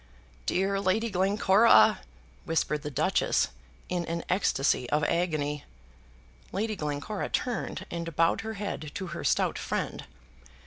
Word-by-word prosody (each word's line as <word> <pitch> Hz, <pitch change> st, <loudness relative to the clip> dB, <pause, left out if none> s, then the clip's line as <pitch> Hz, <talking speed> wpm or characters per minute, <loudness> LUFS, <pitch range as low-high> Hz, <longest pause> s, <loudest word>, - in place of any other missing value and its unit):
"Dear 195 Hz, +1 st, +1 dB
Lady 210 Hz, +4 st, +1 dB
Glencora," 195 Hz, +3 st, +5 dB, 0.5 s
whispered 150 Hz, -2 st, 0 dB
the 150 Hz, -, -4 dB
Duchess, 155 Hz, +7 st, +1 dB, 0.4 s
in 180 Hz, -1 st, -1 dB
an 170 Hz, 0 st, -3 dB
ecstasy 135 Hz, -8 st, +1 dB
of 150 Hz, +1 st, +1 dB
agony. 150 Hz, -3 st, 0 dB, 0.9 s
Lady 215 Hz, +2 st, -1 dB
Glencora 150 Hz, +5 st, -3 dB
turned 245 Hz, -2 st, -2 dB
and 170 Hz, -2 st, -4 dB
bowed 165 Hz, +1 st, +3 dB
her 220 Hz, 0 st, -5 dB
head 200 Hz, -7 st, -4 dB
to 190 Hz, -2 st, -4 dB
her -, -, -5 dB
stout -, -, +1 dB
friend. -, -, -3 dB
180 Hz, 125 wpm, -28 LUFS, 150-200 Hz, 0.9 s, Glencora